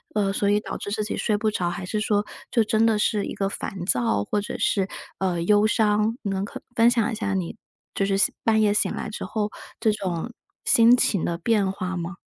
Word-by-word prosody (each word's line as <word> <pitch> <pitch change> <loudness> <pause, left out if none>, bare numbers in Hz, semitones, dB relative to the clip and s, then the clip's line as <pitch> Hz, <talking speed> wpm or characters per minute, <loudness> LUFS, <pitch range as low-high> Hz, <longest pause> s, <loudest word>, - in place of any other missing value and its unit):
呃， 195 -2 +1
所 200 +1 +1
以 205 +1 +3
导 - - -6
致 200 - -6
自 215 0 -1
己 210 - -3
睡 210 -2 0
不 215 0 +1
着， 175 -4 -1
还 180 +1 -5
是 215 +3 -2
说， 210 -1 +1 0.3
就 230 -3 +3
真 220 +1 +2
的 220 -2 +3
是 210 -1 +1
一 - - -5
个 195 - -1
烦 190 -3 -5
躁？ 115 - +1
或 205 - -1
者 - - -5
是， 195 -2 +1 0.3
呃， 180 -3 0
忧 210 +3 +4
伤？ 215 +1 +2
能 195 -1 -1
可 - - -9
分 230 0 +6
享 235 -3 +1
一 - - -3
下 205 -3 -2
你 185 0 -2 0.4
就 195 - 0
是 195 0 +1 0.3
半 220 -1 +3
夜 205 -1 +3
醒 - - +1
来 - - -4
之 - - -6
后， 210 -1 -2 0.3
这 220 - +3
种 190 +2 -3 0.3
心 230 +1 +6
情 195 -7 +1
的 170 -1 -1
变 200 0 +1
化 185 -1 -4
吗？ 175 +2 -5
205 Hz, 245 characters per minute, -24 LUFS, 190-215 Hz, 0.4 s, 分